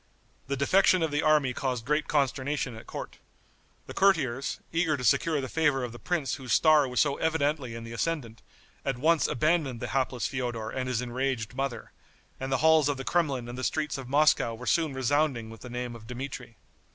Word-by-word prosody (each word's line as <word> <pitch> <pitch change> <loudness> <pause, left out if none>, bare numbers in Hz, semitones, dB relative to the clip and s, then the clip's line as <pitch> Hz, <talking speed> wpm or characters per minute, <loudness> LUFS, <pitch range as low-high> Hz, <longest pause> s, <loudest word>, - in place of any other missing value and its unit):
The 140 0 -2
defection 185 +5 +4
of 160 - 0
the 145 0 +1
army 150 -4 +3
caused 125 -3 -2
great 150 +3 0
consternation 140 -2 0
at 110 - -12
court. - - -7 0.7
The - - -8
courtiers, 140 -10 +1
eager 165 -3 +1
to 125 - -6
secure 155 +6 +2
the 130 - -3
favor 145 -3 +1
of 120 - -4
the 120 - -10
prince 165 -8 -1
whose 130 -4 -3
star 155 -3 +5
was 125 0 -1
so 140 -2 +2
evidently 150 -6 0
in 115 - -7
the 115 0 -8
ascendant, 115 -4 -3 0.4
at 135 -2 -1
once 160 +4 +3
abandoned 150 -3 +1
the - - -4
hapless 130 -2 -1
Feodor 120 -4 -3
and 130 -1 -3
his 125 -1 -1
enraged 125 -2 -2
mother; 135 -3 -4 0.5
and 135 0 -4
the 130 - +3
halls 160 -2 +5
of 145 - -1
the 135 - -6
Kremlin 140 -8 0
and 120 +1 -7
the - - -4
streets 150 -1 -1
of 130 -2 -8
Moscow 140 -5 +3
were 125 +3 -9
soon 155 0 +1
resounding 130 -3 0
with 115 - -12
the 125 - -9
name 120 0 -4
of 110 -1 -12
Dmitri. 125 -2 -7
135 Hz, 200 wpm, -28 LUFS, 125-150 Hz, 0.7 s, star